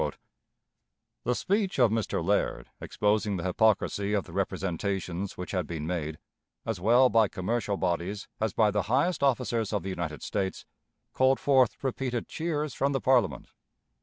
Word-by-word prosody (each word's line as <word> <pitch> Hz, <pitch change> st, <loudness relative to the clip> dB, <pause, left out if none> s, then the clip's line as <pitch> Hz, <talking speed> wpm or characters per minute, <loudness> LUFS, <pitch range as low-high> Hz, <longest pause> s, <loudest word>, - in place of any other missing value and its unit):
The 125 Hz, +1 st, +1 dB
speech 195 Hz, -, 0 dB
of 120 Hz, -5 st, +5 dB
Mr. 110 Hz, -6 st, -1 dB
Laird, 100 Hz, +2 st, 0 dB
exposing 105 Hz, -1 st, 0 dB
the 85 Hz, -, -4 dB
hypocrisy 100 Hz, +1 st, +1 dB
of 100 Hz, -3 st, +1 dB
the -, -, -13 dB
representations 95 Hz, 0 st, -2 dB
which 90 Hz, -, -6 dB
had 90 Hz, -5 st, -1 dB
been 80 Hz, -3 st, -4 dB
made, 80 Hz, -3 st, -3 dB, 0.5 s
as 110 Hz, -5 st, -2 dB
well 120 Hz, +6 st, +6 dB
by 115 Hz, -3 st, +4 dB
commercial 100 Hz, +2 st, -2 dB
bodies 95 Hz, +3 st, -2 dB
as 110 Hz, -1 st, 0 dB
by 105 Hz, 0 st, +3 dB
the 105 Hz, 0 st, +1 dB
highest 140 Hz, +7 st, +2 dB
officers 120 Hz, -5 st, +1 dB
of 105 Hz, -2 st, -1 dB
the 95 Hz, -, -4 dB
United 85 Hz, -6 st, -4 dB
States, 95 Hz, -2 st, -3 dB, 0.5 s
called 130 Hz, +1 st, +3 dB
forth 130 Hz, -4 st, +3 dB
repeated 130 Hz, -2 st, -2 dB
cheers 155 Hz, -4 st, -2 dB
from 140 Hz, +1 st, 0 dB
the 135 Hz, -, +1 dB
Parliament. 125 Hz, -6 st, +2 dB
105 Hz, 155 wpm, -28 LUFS, 95-125 Hz, 0.5 s, well